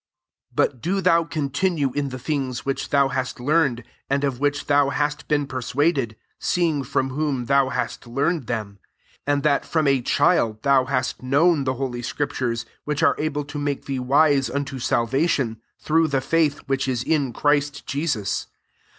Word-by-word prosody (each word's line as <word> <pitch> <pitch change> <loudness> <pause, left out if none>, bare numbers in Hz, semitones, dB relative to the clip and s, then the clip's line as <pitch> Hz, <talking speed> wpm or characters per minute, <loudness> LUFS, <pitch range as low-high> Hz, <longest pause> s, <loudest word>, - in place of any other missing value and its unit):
1 - - +4
4 - - -23
But 125 - -22
do 190 +4 0
thou 170 -3 +4
continue 150 -1 -1
in 145 -1 -1
the 130 - -6
things 130 -2 -3
which 135 0 -2
thou 140 -1 +3
hast 130 -1 -3
learned, 140 -3 +1 0.3
and 140 +1 +1
of 135 -3 -1
which 145 0 0
thou 145 -1 +3
hast 145 +1 -2
been 145 -1 +1
per 130 -2 -5
suaded, 135 -3 0 0.2
seeing 165 -5 +1
from 135 0 -1
whom 140 -3 -1
thou 140 0 +3
hast 130 -1 -3
learned 140 +3 -1
them; 105 -4 -4 0.5
15 - - +3
and 140 -1 +1
that 145 -2 +2
from* 160 -2 0
a 135 -2 +3
child 120 -6 +2
thou 135 -2 +4
hast 130 -1 -1
known 140 +3 +3
the 130 0 0
holy 125 -2 -3
scriptures, 120 -3 -2 0.2
which' 150 -1 -2
are - - +5
able 150 -1 -2
to 145 +1 -6
make 145 -1 -2
thee 135 -2 -2
wise 140 +1 +3
unto 140 -1 -3
salvation, 120 -1 0 0.2
through 160 +1 +2
the 140 -3 +1
faith 155 +1 +1
which 135 -1 -1
is 125 -2 -1
in 145 -4 +1
Christ 145 +1 0
Jesus. 140 - -2
140 Hz, 180 wpm, -23 LUFS, 130-150 Hz, 0.5 s, are